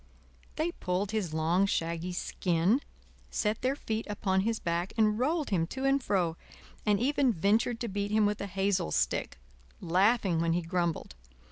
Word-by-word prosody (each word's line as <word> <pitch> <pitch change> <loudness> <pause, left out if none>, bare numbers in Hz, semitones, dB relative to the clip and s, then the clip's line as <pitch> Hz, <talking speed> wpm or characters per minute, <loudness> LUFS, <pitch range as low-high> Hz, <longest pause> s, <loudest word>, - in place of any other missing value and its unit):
They 320 +3 0
pulled 190 - -2
his 210 -7 -1
long, 165 +5 +2
shaggy 170 0 -2
skin, 180 - +1 0.5
set 210 +1 -1
their 260 +2 +1
feet 220 -5 -3
upon 190 -2 +1
his 225 +2 0
back 170 +2 -2
and 215 -1 +3
rolled 300 +2 0
him 165 -4 +1
to 265 +7 -4
and 275 0 +3
fro, 175 -8 0 0.5
and 205 -1 +4
even 275 +1 +2
ventured 220 +5 +1
to 235 - -1
beat 200 0 -2
him 215 0 +3
with 205 0 0
a 200 - -3
hazel 195 - 0
stick, - - 0 0.4
laughing 190 0 +2
when 165 0 +1
he 175 0 0
grumbled. 170 -1 -2
200 Hz, 165 wpm, -30 LUFS, 175-225 Hz, 0.5 s, and